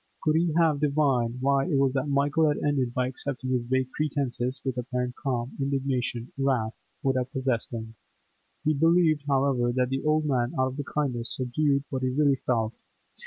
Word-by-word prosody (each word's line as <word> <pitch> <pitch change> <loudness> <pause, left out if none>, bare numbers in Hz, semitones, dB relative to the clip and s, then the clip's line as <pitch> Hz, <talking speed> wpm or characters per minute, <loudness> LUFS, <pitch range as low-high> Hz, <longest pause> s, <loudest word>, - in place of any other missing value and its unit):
Could 155 0 +2
he 165 +1 +2
have 160 -4 +3
divined 140 -5 +1
why 135 +2 +2
it 165 - 0
was 135 -1 +3
that 135 +1 -1
Michael 145 +3 +2
had 150 - +1
ended 135 -4 0
by 125 +1 0
accepting 130 0 -4
his 125 -1 +2
vague 130 0 0
pretences 135 -3 -2
with 130 -2 -1
apparent 125 0 -3
calm, 125 -3 -2
indignation, 130 -3 -1
wrath, 125 -5 +1 0.3
would 135 -1 +2
have 130 +1 -2
possessed 130 -5 -1
him; 110 -1 -6 0.7
he 155 - +2
believed, 160 -1 +3
however, 135 -3 +2
that 125 0 +1
the 135 0 -1
old 155 0 +2
man 125 -4 0
out 130 0 +1
of 145 - -3
kindness 125 -6 -1
subdued 140 +2 +1
what 130 -1 -2
he 130 - +1
really 140 +1 +2
felt. 115 -3 +1
135 Hz, 180 wpm, -27 LUFS, 125-145 Hz, 0.7 s, have